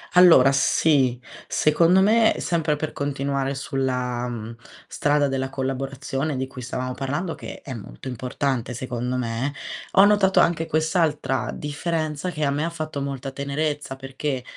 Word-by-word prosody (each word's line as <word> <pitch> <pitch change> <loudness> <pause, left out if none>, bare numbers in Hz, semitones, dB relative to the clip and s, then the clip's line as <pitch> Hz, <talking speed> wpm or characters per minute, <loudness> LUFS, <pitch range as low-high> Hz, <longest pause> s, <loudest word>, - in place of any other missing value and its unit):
Allora 165 -7 +8
sì, 135 -3 +3 0.3
secondo 170 +5 +4
me, 220 +2 +4
sempre 160 -3 0
per 155 +1 -4
continuare 140 -1 -2
sulla, 125 -3 -2
mhmm, 115 -1 -6 0.3
strada 145 -1 +1
della 135 0 -2
collaborazione 135 +2 -3
di 130 0 -2
cui 130 -1 -9
stavamo 125 +1 -3
parlando 145 +7 -3
che - - -9
è 135 - -7
molto 115 +4 -8
importante 125 0 -2
secondo 125 0 -3
me, 125 +3 -2 0.4
ho 195 - +7
notato 205 -2 +5
anche 165 -1 +1
quest'altra 155 -4 0
differenza 155 +2 -3
che 155 -3 -3
a 140 - +2
me 150 +3 0
ha - - -1
fatto 155 -3 -5
molta 135 -1 -4
tenerezza, 140 0 -2
perché 135 0 -4
140 Hz, 145 wpm, -24 LUFS, 130-155 Hz, 0.4 s, Allora